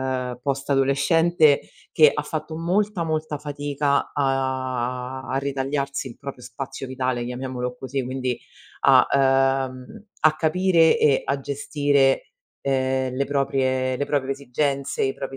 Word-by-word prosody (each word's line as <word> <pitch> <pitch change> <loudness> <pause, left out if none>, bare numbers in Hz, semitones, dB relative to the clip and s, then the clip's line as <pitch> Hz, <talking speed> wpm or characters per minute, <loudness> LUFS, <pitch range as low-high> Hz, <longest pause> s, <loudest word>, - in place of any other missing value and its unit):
ehm, 125 -2 -3
post 140 0 -2
adolescente 145 +3 +3 0.3
che 155 -3 +6
ha 150 - -2
fatto 155 +1 -5
molta, 185 +1 0
molta 155 -2 -2
fatica 145 -1 -1
a 130 -2 -1
a 130 - -1
ritagliarsi 140 0 -2
il 120 - -13
proprio 140 -3 -8
spazio 135 +1 -7
vitale, 130 -2 -2
chiamiamolo 125 0 -4
così, 135 0 -3
quindi 130 -1 -2 0.4
a - - +6
ehm, 135 - +1 0.2
a 155 0 +4
capire 165 +1 +3
e 140 -3 +3
a 140 0 -1
gestire, 140 -1 +1 0.3
ehm, 130 -1 0
le 140 - 0
proprie 130 -2 0
le 145 - -1
proprie 135 -2 0
esigenze, 140 +1 -2
i 135 - 0
propri 135 -1 -6
135 Hz, 135 wpm, -23 LUFS, 130-145 Hz, 0.4 s, che